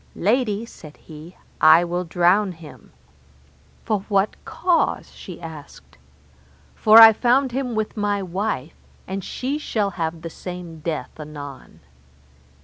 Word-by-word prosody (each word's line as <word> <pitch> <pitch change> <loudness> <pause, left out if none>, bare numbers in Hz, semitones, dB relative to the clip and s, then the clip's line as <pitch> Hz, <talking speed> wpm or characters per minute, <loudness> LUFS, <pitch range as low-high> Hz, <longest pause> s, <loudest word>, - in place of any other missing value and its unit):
Lady, 215 +1 0
said 155 -9 -14
he, 160 +3 -13 0.2
I 160 +2 +7
will 175 +1 -2
drown 180 +4 +2
him. 160 -2 -15 0.9
For 215 -2 0
what 200 0 +1
cause? 355 -2 0
she 180 - -11
asked. 160 - -12 0.7
For 215 +1 +5
I 225 -1 +11
found 255 +4 +2
him 250 -2 -3
with 215 -1 -2
my 205 -2 -1
wife, 180 -5 -3 0.3
and 190 0 -5
she 275 +9 -4
shall 210 -8 -1
have 165 -2 -4
the 165 - -5
same 175 -2 -8
death 160 0 -5
anon. 145 - -10
185 Hz, 130 wpm, -22 LUFS, 160-220 Hz, 0.9 s, I